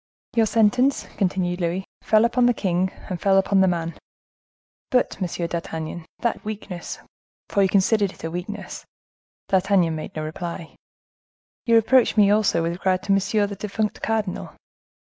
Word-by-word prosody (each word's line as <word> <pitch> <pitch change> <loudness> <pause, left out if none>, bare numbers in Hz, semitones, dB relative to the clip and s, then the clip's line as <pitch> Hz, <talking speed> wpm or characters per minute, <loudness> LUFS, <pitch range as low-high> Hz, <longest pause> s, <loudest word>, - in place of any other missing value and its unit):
"Your 225 -2 +4
sentence," 245 +6 +2
continued 180 -2 0
Louis, 175 +3 -1 0.2
"fell 215 +1 +4
upon 240 +1 +3
the 245 - +3
king 185 -1 0 0.2
and 180 -2 -5
fell 195 -1 +4
upon 195 0 +3
the 190 - +5
man. 170 -2 -1 1.0
But, 250 -4 +1
Monsieur 175 -1 -2
d'Artagnan, 165 -1 -5
that 235 - -1
weakness, 205 -4 -6 0.5
for 200 - +2
you 190 - +3
considered 200 +1 +2
it - - -16
a 160 - -3
weakness?"—D'Artagnan 190 -1 -2
made 155 - -7
no 155 - -3
reply—"you 170 +7 -6
reproached 230 +2 +4
me 205 -1 +6
also 205 -5 +2
with 165 - 0
regard 185 +1 0
to 200 - -1
monsieur, 205 +2 +2
the 200 0 -5
defunct 210 +2 -3
cardinal. 215 -4 -2
195 Hz, 145 wpm, -23 LUFS, 175-215 Hz, 1.0 s, me